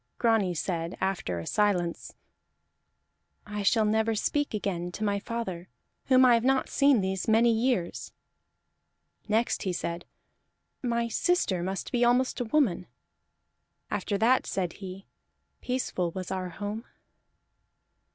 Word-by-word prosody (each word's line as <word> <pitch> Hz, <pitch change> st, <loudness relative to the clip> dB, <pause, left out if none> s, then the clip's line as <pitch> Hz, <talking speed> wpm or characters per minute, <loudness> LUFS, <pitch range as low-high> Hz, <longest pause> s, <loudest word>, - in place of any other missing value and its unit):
Grani 220 Hz, -7 st, +2 dB
said 170 Hz, +1 st, -3 dB
after 190 Hz, -, -1 dB
a 85 Hz, -, -5 dB
silence: 185 Hz, -5 st, 0 dB, 1.3 s
"I 210 Hz, 0 st, -4 dB
shall 215 Hz, +2 st, +3 dB
never 220 Hz, +1 st, +1 dB
speak 290 Hz, +3 st, 0 dB
again 180 Hz, -4 st, -2 dB
to 215 Hz, -, -4 dB
my 200 Hz, -1 st, +1 dB
father, 190 Hz, -6 st, -5 dB, 0.4 s
whom 260 Hz, -1 st, +6 dB
I 245 Hz, -, +7 dB
have 230 Hz, -1 st, +3 dB
not 265 Hz, +1 st, +2 dB
seen 280 Hz, -6 st, +4 dB
these 190 Hz, 0 st, -2 dB
many 230 Hz, +2 st, +5 dB
years." 225 Hz, -6 st, -1 dB, 1.2 s
Next 220 Hz, +3 st, +1 dB
he 190 Hz, -, -1 dB
said: 170 Hz, -1 st, -4 dB, 0.8 s
"My 235 Hz, -2 st, 0 dB
sister 230 Hz, -, +1 dB
must 190 Hz, +1 st, -4 dB
be 245 Hz, -1 st, +2 dB
almost 250 Hz, +2 st, +2 dB
a 245 Hz, -, -1 dB
woman." 220 Hz, -, +1 dB, 1.0 s
After 200 Hz, -, -1 dB
that 240 Hz, +5 st, +3 dB
said 180 Hz, -3 st, -2 dB
he: 190 Hz, 0 st, -9 dB, 0.6 s
"Peaceful 250 Hz, -8 st, -1 dB
was 185 Hz, +2 st, -6 dB
our 185 Hz, -1 st, -3 dB
home." 205 Hz, +5 st, -5 dB
210 Hz, 130 wpm, -28 LUFS, 185-235 Hz, 1.3 s, I